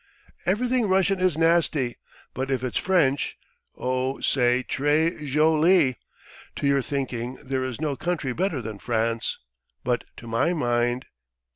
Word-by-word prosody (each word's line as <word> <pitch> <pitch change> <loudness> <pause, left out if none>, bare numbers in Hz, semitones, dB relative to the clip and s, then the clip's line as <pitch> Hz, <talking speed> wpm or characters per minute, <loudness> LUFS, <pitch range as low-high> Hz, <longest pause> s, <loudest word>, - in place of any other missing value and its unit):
"Everything 240 +3 +1
Russian 190 0 +3
is 185 -4 +2
nasty, 165 -6 +2 0.4
but 130 +1 -3
if 130 -2 -1
it's 130 - -1
French 165 -7 +1 0.4
o 130 +1 -1
say 125 -1 +2
tray 150 +5 +2 0.2
zholee! 155 0 +4 0.6
To - - -3
your 140 -1 +3
thinking 130 -3 -3
there 130 -1 -2
is 130 -2 -4
no 150 -3 -1
country 155 -5 -2
better 160 -5 -1
than 105 -2 -6
France, 115 0 -1 0.5
but 125 -1 0
to - - -11
my 115 +9 +1
mind. 120 -4 0
135 Hz, 135 wpm, -25 LUFS, 125-165 Hz, 0.6 s, zholee